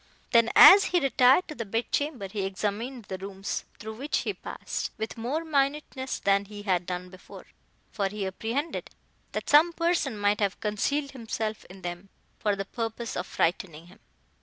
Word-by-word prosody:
Then, 230 -1 +5
as 395 +1 +10
he 355 - +2
retired 265 +3 +4
to 305 - -6
the 240 - -4
bed 225 +3 -3
chamber, 285 -9 -1
he 200 +1 -4
examined 210 +5 -3
the 190 -1 -6
rooms 195 0 -5
through 220 0 -8
which 285 +5 -1
he - - -2
passed, - - -5
with 220 0 -4
more 260 +8 -3
minuteness 275 -2 -1
than 200 0 +2
he 205 0 -9
had 180 -3 0
done 180 0 -4
before, 185 - -13 0.5
for 200 -3 -1
he 205 0 -4
apprehended 230 - -3 0.4
that - - -4
some 315 +4 +6
person 335 -9 0
might 205 0 +1
have 200 -2 0
concealed 280 +7 -1
himself 220 -3 -4
in 190 +1 -14
them, 175 +2 -6 0.3
for 210 -1 +1
the 195 0 -4
purpose 230 +2 -4
of - - -3
frightening 165 -1 -1
him. 220 - -22
220 Hz, 175 wpm, -27 LUFS, 195-275 Hz, 0.5 s, as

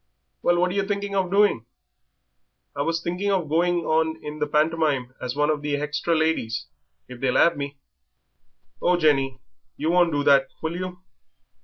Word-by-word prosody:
"Well, 175 - +2
what 180 +1 +2
are - - -4
yer 200 0 -1
thinking 200 -1 -2
of 190 -2 0
doing?" 200 - +2 1.1
"I 140 - -2
was 165 +3 -1
thinking 180 +4 -2
of 185 -5 0
going 175 +3 +1
on 160 0 +1
in 150 +1 -6
the 150 - 0
pantomime 150 -4 +1
as 125 0 -4
one 150 +1 +2
of 150 -1 -2
the 145 -1 -1
hextra 150 +3 -1
ladies, 155 -8 0 0.4
if 125 -1 -10
they'll 130 -1 +1
'ave 170 - +5
me." 140 0 -5 1.0
"Oh, 180 0 +3
Jenny, 135 -5 +2 0.4
you 155 +3 0
won't 175 -1 +4
do 145 -1 0
that, 140 -1 +5 0.2
will 160 +1 -2
you? 180 0 -6
160 Hz, 175 wpm, -24 LUFS, 145-175 Hz, 1.1 s, ave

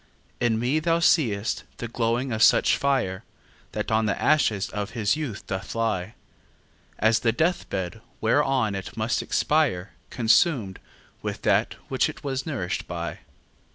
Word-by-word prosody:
In 120 -2 +2
me 125 +7 +1
thou 165 +1 +2
see'st 115 - +2
the 120 - -4
glowing 120 +2 -1
of 110 -1 -2
such - - +5
fire, 130 -10 0 0.5
That 105 +1 -3
on 110 0 +2
the 100 - -1
ashes 110 -10 +2
of 105 -1 -3
his 105 +3 +2
youth 145 -10 -5
doth 95 0 -5
lie, 110 -3 -1 0.8
As 110 +1 +3
the 115 - +2
death 165 +8 0
bed, 95 +2 -4 0.2
whereon 130 -2 +2
it 95 +1 -6
must 110 +2 0
expire, 125 - +1 0.2
Consum'd 115 - +2 0.4
with - - -5
that - - +2
which - - +1
it - - -10
was 135 0 -3
nourish'd 120 - -3
by. 85 -1 -5
115 Hz, 150 wpm, -25 LUFS, 100-135 Hz, 0.8 s, such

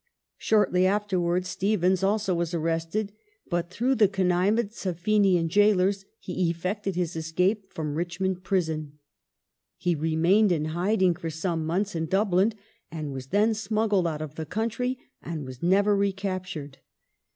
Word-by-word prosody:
Shortly 185 -4 +3
afterwards 185 -3 0
Stephens 190 -2 +1
also 200 0 +1
was 170 0 -1
arrested 165 +5 -1 0.4
but, 170 0 -1
through 240 +8 +1
the 215 -5 +5
connivance 195 +4 0
of 175 -3 -2
Fenian 195 -3 +3
gaolers, 195 +1 +3
he 180 -1 -1
effected 185 +3 -3
his 175 -2 -2
escape 180 +6 0
from 150 -2 -4
Richmond 175 +3 -2
prison. 160 -6 -1 0.8
He 175 - 0
remained 165 +6 +3
in 155 -3 +1
hiding 185 +1 +2
for 165 0 -5
some 160 0 -2
months 195 +5 -1
in 165 -1 -2
Dublin 195 +3 +2 0.4
and 155 -4 -5
was 130 -1 -7
then 210 +8 +3
smuggled 215 -3 +1
out 155 -1 -3
of 150 -2 -8
the 160 0 -5
country 230 - -2 0.2
and 160 -4 -5
was 130 -1 -9
never 200 +4 +3
recaptured. 185 -7 -3
185 Hz, 140 wpm, -26 LUFS, 165-205 Hz, 0.8 s, the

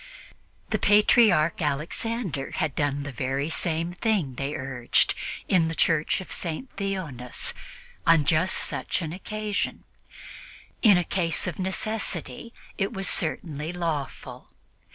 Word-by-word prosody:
The - - +1
Patriarch 205 -6 +5
Alexander 155 - -2
had 150 - 0
done 145 0 0
the 145 - -5
very 135 +4 -2
same 170 +1 -1
thing, 180 - 0
they 140 +3 -3
urged, 130 -2 +1 0.3
in 170 -4 +3
the 165 - -3
Church 160 +2 +2
of 190 - -11
St. 175 +10 -4
Theonas 175 - -2 0.5
on 165 -3 +6
just 160 +5 +3
such - - -1
an 160 0 -4
occasion; 210 +2 -3 1.0
in 205 -6 +7
a 175 - +2
case 170 -3 0
of 180 - -4
necessity 190 - -2 0.3
it 195 +2 0
was 195 -3 -1
certainly 155 -2 -1
lawful. 165 -6 -4
165 Hz, 125 wpm, -26 LUFS, 145-195 Hz, 1.0 s, in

